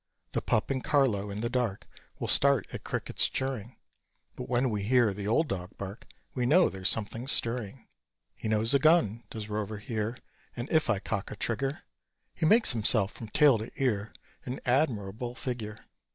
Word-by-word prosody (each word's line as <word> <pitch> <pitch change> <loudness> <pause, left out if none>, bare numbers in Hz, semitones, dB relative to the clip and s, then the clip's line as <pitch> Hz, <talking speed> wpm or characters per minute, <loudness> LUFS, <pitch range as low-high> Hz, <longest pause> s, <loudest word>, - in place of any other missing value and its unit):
The - - -2
pup 110 +4 0
and 130 -1 -2
Carlo 115 -9 +1
in 100 +1 -5
the 120 - -1
dark 120 -6 -2 0.3
Will - - -4
start 140 -6 +4
at - - -7
crickets - - 0
chirring; 130 -3 -3 0.6
But - - -8
when 125 0 +1
we 105 -1 -2
hear 115 0 +3
the 100 +1 -6
old 155 +9 +2
dog 90 -4 -6
bark 100 +2 -8 0.3
We 125 -2 -1
know 175 +7 +5
there's 95 0 -1
something 115 +3 0
stirring. 120 -2 +2 0.5
He - - -7
knows 110 +2 +1
a 140 - +4
gun, 125 - +3
does 110 -2 -7
Rover 105 0 -4
here; 110 +2 -4 0.4
And 120 +1 -5
if 160 -5 +2
I 110 - +2
cock 100 0 -4
a - - -7
trigger, 135 +7 -2 0.5
He 160 - 0
makes 225 +6 +5
himself 110 -3 +5
from 115 - -9
tail 140 -2 +4
to 110 - -6
ear 110 -6 -1 0.3
An 125 +1 -5
admirable 120 -3 -1
figure. 115 -5 -5
115 Hz, 180 wpm, -29 LUFS, 105-130 Hz, 0.6 s, know